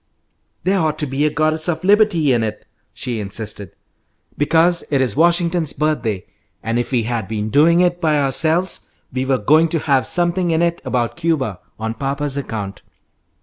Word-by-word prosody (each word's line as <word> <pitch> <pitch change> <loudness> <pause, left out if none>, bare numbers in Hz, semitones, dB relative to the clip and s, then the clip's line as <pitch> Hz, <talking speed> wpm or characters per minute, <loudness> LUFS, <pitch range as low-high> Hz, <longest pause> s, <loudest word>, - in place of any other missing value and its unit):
"There 190 +1 +2
ought 155 -2 0
to 155 - -2
be 140 +2 0
a - - +1
Goddess 155 +2 0
of 160 -1 -2
Liberty 190 -8 +3
in 120 - +1
it," 105 -1 -4 0.3
she 120 -3 -4
insisted, 105 0 -5 0.6
"because 165 +4 +3
it 140 - +1
is 125 -6 0
Washington's 170 -1 +2
birthday; 120 -11 -1 0.4
and 115 +1 -1
if 120 - -3
we 120 -3 +1
had 115 -3 -3
been 105 0 -3
doing 165 +5 +5
it 175 0 +1
by 155 -3 +2
ourselves 155 +6 0 0.3
we 130 0 -1
were 135 -1 +2
going 155 +9 +4
to 165 - 0
have 140 -4 +1
something 175 0 +1
in 165 +1 +2
it 170 0 0
about 120 +1 -2
Cuba, 150 - -1 0.2
on 110 0 -3
papa's 140 +3 -3
account." 110 -8 -5
145 Hz, 175 wpm, -19 LUFS, 120-170 Hz, 0.6 s, doing